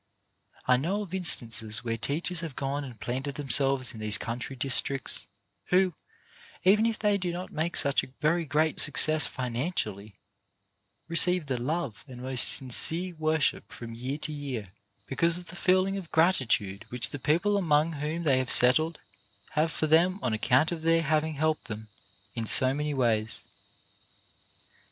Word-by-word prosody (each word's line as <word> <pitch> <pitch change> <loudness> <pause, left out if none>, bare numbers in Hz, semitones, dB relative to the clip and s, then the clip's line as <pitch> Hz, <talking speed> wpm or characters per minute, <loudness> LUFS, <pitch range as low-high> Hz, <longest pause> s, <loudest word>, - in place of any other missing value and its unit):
I 125 0 +3
know 190 +10 -2
of 185 -3 -12
instances 115 - +2
where 115 -1 -2
teachers 155 +9 -3
have 160 -6 -7
gone 140 +1 -3
and 125 -5 -11
planted 135 +4 -4
themselves 135 -1 +3
in 110 - -10
these 105 -2 +4
country 125 +5 -6
districts 135 +1 -1 0.4
who, 185 0 +2 0.7
even 210 +4 +4
if 225 -1 -2
they 205 -1 0
do 180 -2 -3
not 180 +2 -7
make 165 +2 -2
such 140 -1 +2
a - - -10
very 165 +3 +1
great 155 +2 0
success 155 -1 +4
financially, 115 - -4 0.9
receive 175 0 +4
the 130 -3 -3
love 140 - -4
and 125 -2 -11
most 130 0 0
sincere 165 +8 +3
worship 155 -8 -1
from 115 -1 -9
year 130 +5 -5
to 155 0 -5
year, 130 -9 -6 0.3
because 165 +7 -1
of 180 -1 -11
the - - -10
feeling 185 +2 +1
of 180 -5 -8
gratitude 110 - +1
which 120 -4 +1
the 145 - -6
people 175 +10 +1
among 160 -4 +1
whom 155 +2 -4
they 135 -5 +2
have 130 - -3
settled 155 +6 +4 0.5
have 155 +2 0
for 160 - -2
them 170 +4 +3
on 120 - -1
account 130 +8 +1
of 170 -2 -5
their 165 +1 +2
having 155 0 -1
helped 155 +1 -1
them 110 -1 -8 0.4
in 115 -1 -5
so 130 +3 +4
many 150 +1 -3
ways. 110 -4 -1
145 Hz, 160 wpm, -27 LUFS, 125-165 Hz, 0.9 s, these